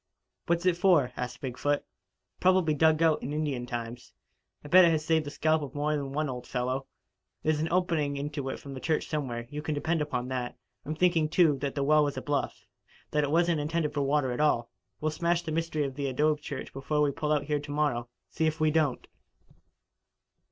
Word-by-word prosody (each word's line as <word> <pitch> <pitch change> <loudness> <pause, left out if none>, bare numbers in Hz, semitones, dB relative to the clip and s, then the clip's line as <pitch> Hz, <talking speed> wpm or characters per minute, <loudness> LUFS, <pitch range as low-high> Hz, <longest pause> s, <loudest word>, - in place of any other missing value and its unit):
What's 170 +1 +1
it 180 -2 +3
for?" 175 -9 +4
asked 125 -1 -5
Big 130 -2 -5
foot. 145 0 0 0.5
"Probably 185 -4 +3
dug 160 +2 +3
out 160 -2 +3
in 135 - -4
Indian 145 -5 -2
times. 120 0 -6 0.5
I'll 145 - -9
bet 185 +1 +9
it 170 - +6
has 155 -2 0
saved 160 -2 +2
the - - -2
scalp 155 +2 +1
of 140 -2 -7
more 145 +1 0
than 140 -2 -3
one 150 +2 -1
old 125 -2 -6
fellow. 130 +2 -2 0.6
There's 155 -1 +1
an 160 - 0
opening 165 -6 +1
into 145 -1 -3
it - - -5
from 140 - -9
the 130 - -6
church 155 +3 0
somewhere, 125 -6 -3
you 150 0 -4
can 155 0 -2
depend 160 +2 0
upon 125 -4 -2
that. 125 -2 -3 0.3
I'm 155 +3 -3
thinking, 165 -2 +2
too, 160 -5 +4
that 140 0 -3
the 140 - 0
well 150 +1 +5
was 145 -2 -2
a - - -2
bluff 145 -1 -2 0.5
that 150 0 +2
it 145 - 0
wasn't 170 +1 +2
intended 155 0 -1
for 145 - 0
water 140 -1 +1
at 125 - -2
all. 150 -6 +2 0.3
We'll 155 0 0
smash 170 +2 0
the 160 - -4
mystery 160 -1 -1
of 135 - -4
the 140 +1 -3
adobe 150 +3 +1
church - - -6
before 150 +2 -1
we 145 - +2
pull 150 +2 -2
out 150 -2 +2
of - - -13
here 150 -1 +1
to 145 0 -8
morrow, 145 -5 0 0.2
see 160 - 0
if 155 0 -2
we 155 0 +3
don't." 150 -4 0
150 Hz, 220 wpm, -29 LUFS, 135-160 Hz, 0.6 s, bet